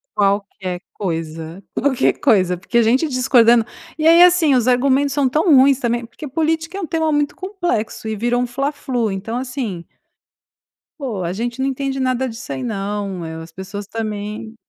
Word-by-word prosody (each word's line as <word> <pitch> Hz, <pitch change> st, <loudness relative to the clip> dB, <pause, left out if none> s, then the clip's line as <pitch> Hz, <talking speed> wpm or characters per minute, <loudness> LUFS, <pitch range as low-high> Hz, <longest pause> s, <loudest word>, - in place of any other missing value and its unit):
Qualquer 195 Hz, -3 st, -1 dB
coisa, 165 Hz, -1 st, -5 dB
qualquer 265 Hz, -1 st, +2 dB
coisa. 185 Hz, -9 st, +3 dB
Porque 195 Hz, +7 st, -2 dB
a -, -, +6 dB
gente 255 Hz, +8 st, +2 dB
discordando 240 Hz, -3 st, +4 dB, 0.3 s
E 310 Hz, 0 st, +2 dB
aí, 335 Hz, +1 st, +7 dB
assim, 350 Hz, -5 st, +5 dB
os 245 Hz, -1 st, +1 dB
argumentos 270 Hz, +2 st, +3 dB
são 280 Hz, -2 st, +2 dB
tão 310 Hz, +3 st, +4 dB
ruins 270 Hz, 0 st, +5 dB
também, 240 Hz, -2 st, -1 dB
porque 235 Hz, +6 st, -9 dB
política 320 Hz, +5 st, -1 dB
é -, -, -4 dB
um -, -, -2 dB
tema 320 Hz, 0 st, 0 dB
muito 295 Hz, -1 st, 0 dB
complexo 355 Hz, -, -3 dB
e 220 Hz, -, -2 dB
vira 240 Hz, +3 st, 0 dB
um 245 Hz, -, +1 dB
fla 275 Hz, +4 st, -2 dB
flu. 250 Hz, -6 st, -2 dB
Então, 205 Hz, +5 st, -4 dB
assim 250 Hz, -9 st, -4 dB, 1.1 s
poxa, 220 Hz, -, -3 dB
a -, -, -3 dB
gente 235 Hz, +5 st, -4 dB
não 265 Hz, -, +1 dB
entende 270 Hz, 0 st, -2 dB
nada 255 Hz, 0 st, 0 dB
disso 235 Hz, +1 st, -8 dB
aí 265 Hz, -, -4 dB
não. 200 Hz, -4 st, -3 dB
Eh, 160 Hz, 0 st, -6 dB
as 165 Hz, +1 st, -11 dB
pessoas 195 Hz, +3 st, -7 dB
também 215 Hz, 0 st, -5 dB
240 Hz, 180 wpm, -19 LUFS, 205-275 Hz, 1.1 s, aí